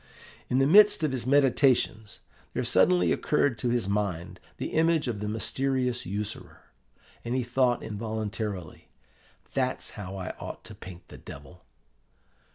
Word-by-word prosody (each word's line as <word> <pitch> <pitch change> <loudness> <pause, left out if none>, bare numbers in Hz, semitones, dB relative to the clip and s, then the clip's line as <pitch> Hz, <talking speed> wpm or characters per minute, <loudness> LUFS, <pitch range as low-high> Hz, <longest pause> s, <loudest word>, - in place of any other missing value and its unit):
In 125 - +1
the 135 - +4
midst 205 +3 +6
of 155 - +1
his 125 -2 -3
meditations 130 -6 +2 0.3
there - - -1
suddenly 90 -2 +3
occurred 145 -5 +1
to 125 - 0
his 120 -4 0
mind 100 -4 -2 0.2
the - - -3
image 160 -2 +2
of 115 -4 -2
the 105 - -3
mysterious 125 +2 -1
usurer; 105 +2 -6 0.5
and 120 +2 -2
he 130 - 0
thought 120 0 +1
involuntarily, 105 -3 -5 0.7
'That's - - -1
how 95 -1 -7
I 90 -1 -4
ought - - -7
to - - -10
paint 90 -1 -11
the - - -11
Devil! 70 +6 -12
115 Hz, 145 wpm, -28 LUFS, 100-130 Hz, 0.7 s, midst